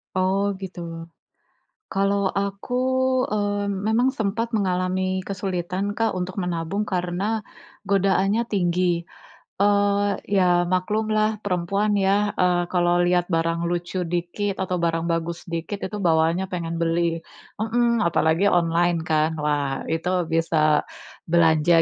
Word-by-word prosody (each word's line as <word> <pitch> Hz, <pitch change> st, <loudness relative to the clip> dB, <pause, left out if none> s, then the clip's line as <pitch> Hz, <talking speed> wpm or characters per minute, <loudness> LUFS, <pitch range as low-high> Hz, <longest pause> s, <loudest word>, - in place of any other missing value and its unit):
Oh, 195 Hz, +2 st, +1 dB
gitu. 185 Hz, -1 st, -7 dB, 1.1 s
Kalau 195 Hz, 0 st, +1 dB
aku, 200 Hz, +4 st, -3 dB, 0.6 s
eee, 205 Hz, -1 st, 0 dB
memang 220 Hz, +5 st, +1 dB
sempat 220 Hz, +2 st, -1 dB
mengalami 185 Hz, -1 st, 0 dB
kesulitan 190 Hz, 0 st, -3 dB
Kak, 225 Hz, -2 st, -1 dB
untuk 185 Hz, +2 st, -3 dB
menabung, 180 Hz, +3 st, -2 dB
karena 190 Hz, +4 st, -1 dB, 0.4 s
godaannya 195 Hz, +2 st, +2 dB
tinggi. 175 Hz, -3 st, +1 dB, 0.6 s
Eee, 205 Hz, 0 st, +2 dB
iya, 195 Hz, -2 st, +3 dB, 0.3 s
maklumlah 215 Hz, +3 st, 0 dB
perempuan 200 Hz, +3 st, 0 dB
ya, 200 Hz, +1 st, +2 dB
eee, 180 Hz, -1 st, +2 dB
kalau 175 Hz, -1 st, +2 dB
lihat 175 Hz, 0 st, +2 dB
barang 165 Hz, 0 st, +1 dB
lucu 175 Hz, +1 st, -3 dB, 0.2 s
dikit 175 Hz, +4 st, -2 dB
atau 185 Hz, -1 st, -1 dB
barang 165 Hz, 0 st, -1 dB
bagus 165 Hz, +1 st, -2 dB
dikit, 170 Hz, +5 st, -3 dB
itu 210 Hz, -, -5 dB
bawaannya 165 Hz, +3 st, +2 dB
pengen 170 Hz, -1 st, -3 dB
beli 165 Hz, +1 st, +1 dB, 0.6 s
hmm, 235 Hz, 0 st, +1 dB
apalagi 165 Hz, +2 st, +2 dB
online 175 Hz, -1 st, +2 dB
kan. 155 Hz, 0 st, +3 dB
Wah, 145 Hz, -2 st, -1 dB
itu 165 Hz, +2 st, -1 dB, 0.2 s
bisa 155 Hz, -2 st, +2 dB, 0.5 s
belanja 165 Hz, 0 st, +4 dB
185 Hz, 115 wpm, -23 LUFS, 170-200 Hz, 1.1 s, belanja